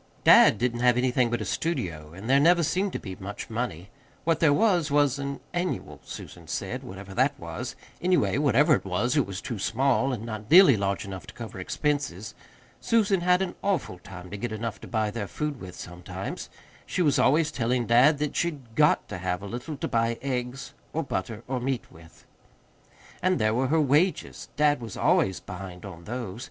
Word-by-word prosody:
Dad - - +7
didn't 120 -1 -1
have 125 0 +4
anything 125 -1 +2
but 120 - -1
a - - -3
studio, 85 - -3
and 95 +6 -9
there 135 +2 +5
never 170 +3 +5
seemed 185 +5 0
to - - -2
be 95 -3 -7
much 100 +3 -7
money. 105 -6 -4 0.3
What 165 0 +1
there 160 -3 +5
was, 175 -2 +3
was 145 -1 +2
an 140 0 -4
"annual," 175 +1 -3
Susan - - -10
said, - - -3
whatever 95 +1 -9
that 135 +6 +1
was. 85 -1 -6 0.3
Anyway, 140 - +2
whatever 145 +2 +4
it - - +1
was, 100 +8 0
it 145 - +2
was 95 0 -5
too 115 -4 -5
small, 135 +5 +1
and 115 -3 -4
not 110 -1 -6
nearly 180 -5 +8
large 100 0 -1
enough 95 -6 -8
to - - -11
cover 110 -5 -8
expenses. 110 - -2 0.5
Susan 205 -5 +2
had 180 +1 +3
an 185 - -4
awful 185 - -1
time 90 -2 -11
to 100 - -5
get 120 +2 -4
enough 110 0 -4
to - - -9
buy 110 -2 0
their 105 -2 -4
food 150 +1 -4
with 90 -1 -8
sometimes. 90 0 -7 0.4
She 180 - 0
was 145 -4 +3
always 155 +3 +3
telling 120 0 0
dad 125 +6 +5
that 150 0 -2
she'd 140 -9 -2
GOT 150 +4 +3
to 105 - -6
have 90 +1 -2
a - - -5
little 120 +8 -6
to - - -3
buy 115 0 0
eggs 125 0 -3 0.2
or 165 - -1
butter 110 -3 -4
or 130 -1 -1
meat 130 0 -3
with. 80 -1 -17 1.0
And 185 0 +2
there 110 0 +2
were 130 +3 +1
her 160 +4 +2
wages 150 +6 +1
dad 145 -3 +3
was 115 -4 -7
always 95 -1 +2
behind 90 -1 -9
on 85 -4 -10
those. 115 -2 -5
125 Hz, 195 wpm, -27 LUFS, 100-150 Hz, 1.0 s, nearly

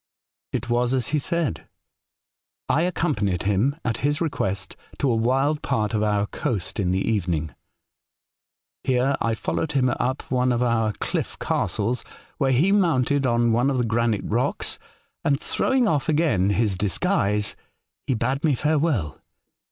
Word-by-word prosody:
"It - - -3
was 120 +1 +1
as 125 -3 0
he 150 - +1
said. 170 -3 -2 1.0
I 155 - +2
accompanied 135 - 0
him, 105 +8 +1
at 115 -2 0
his 145 +1 0
request, 100 - -2 0.2
to 140 -3 +1
a - - +2
wild 135 +6 +1
part 110 0 -1
of 105 - +1
our 105 -1 +1
coast 105 -2 -3
in 95 -3 +1
the 95 +1 0
evening. 85 - -1 1.3
Here 130 +1 +2
I 115 -1 +1
followed 150 +6 -2
him 130 -2 +3
up 130 +3 -1
one 125 0 +2
of 120 0 +1
our 115 -3 +1
cliff - - -3
castles, 115 +5 -1 0.4
where 135 -3 +2
he 150 +10 +3
mounted 145 -8 +2
on 120 -1 +2
one 120 +4 +2
of 135 - 0
the 120 - +1
granite 115 -2 +1
rocks, - - -1 0.4
and, 140 -1 +2
throwing 260 +6 +1
off 150 -7 0
again 145 - +2
his 100 -1 +1
dis 95 -2 0
guise, 105 - +1 0.5
he 130 - +1
bade 130 +5 -1
me 150 -4 +3
farewell. 145 - 0
125 Hz, 155 wpm, -24 LUFS, 105-145 Hz, 1.3 s, him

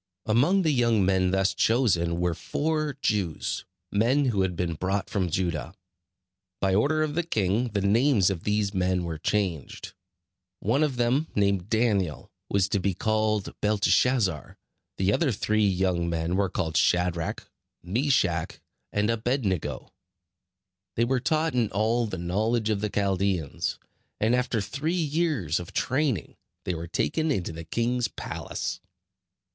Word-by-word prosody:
Among 140 - +3
the 160 - +3
young 115 -6 +3
men 95 -1 +2
thus 95 +1 +2
chosen 90 -9 +2
were 90 -1 +1
four 155 - -2
Jews, 95 -7 -1 0.3
men 125 +8 +2
who 110 -7 +1
had 95 -2 0
been 85 0 -1
brought 95 +5 -2
from 95 -4 0
Judah. 85 -1 -2 0.8
By 95 -1 +1
order 150 +10 +2
of 150 -1 -2
the 175 - +1
king 110 - 0
the 105 -3 -2
names 105 0 +3
of 85 -3 -5
these 105 -1 0
men 90 -1 +1
were 80 -2 -4
changed. 90 -6 -2 0.7
One 115 +9 +1
of 150 -4 +1
them, 125 +6 +1
named 100 -2 +1
Daniel, 105 -8 0 0.2
was 100 -1 +2
to 100 - +1
be 95 -1 -1
called 110 -1 0
Belteshazzer; 105 - +2 0.4
the 95 +2 +2
other 155 -1 +2
three 110 0 +1
young 90 -2 0
men 85 +1 -1
were 100 -1 +1
called 80 -4 -1
Shadrach, 90 -2 +1 0.4
Meshach 100 - 0 0.3
and 105 +2 +1
Abed 120 +3 -1
nego. 95 -5 -3 1.0
They 115 - +2
were 130 +1 +1
taught 155 +5 0
in 120 -4 +1
all 115 +3 +1
the 95 - -5
knowledge 110 +6 0
of 100 -2 -1
the 105 - -1
Chaldeans; 95 -6 -1 0.4
and 110 +3 +2
after 125 -3 +1
three 145 - -2
years 150 - 0
of 90 - -9
training 130 - -1 0.3
they 90 - -2
were 85 0 -5
taken 160 - 0
into 95 -12 -1
the 80 0 -8
king's 120 +5 0
palace. - - -5
105 Hz, 150 wpm, -26 LUFS, 90-120 Hz, 1.0 s, Among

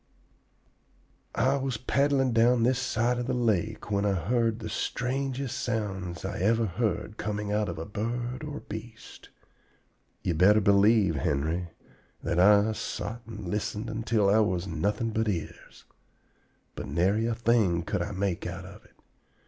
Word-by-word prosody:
"I 130 +5 +2
was 135 -3 -2
paddling 135 +1 +1
down 115 +1 +4
this 125 +1 +2
side 120 -1 0
of 120 - -3
the - - 0
lake 110 -3 0
when 100 0 +1
I 100 -1 +2
heard 115 +4 +1
the 110 -2 -6
strangest 130 +4 -2
sounds 95 -7 -3
I 95 0 -4
ever 115 +4 +2
heard 105 +1 -2
coming 105 -1 -3
out 105 -1 0
of 85 - -5
a 80 - -5
bird 120 +5 -3
or 150 -1 -6
beast. 110 +1 -10 0.9
Ye 90 - 0
better 95 +6 +5
believe, 100 -3 +4
Henry, 80 +6 -1 0.5
that 85 - 0
I 105 +3 +6
sot 115 +1 -4
and 105 -4 -7
listened 105 +3 -3
until 110 -2 +1
I 105 +3 +5
was 95 -5 +1
nothing 100 +7 -1
but 110 0 0
ears. 85 -5 -6 0.9
But - - -6
nary 95 +9 +1
a 115 - 0
thing 110 -8 +2
could - - -2
I 105 - -3
make 95 -3 -2
out 90 +1 -6
of 100 +3 -12
it. - - -24
105 Hz, 155 wpm, -28 LUFS, 95-120 Hz, 0.9 s, I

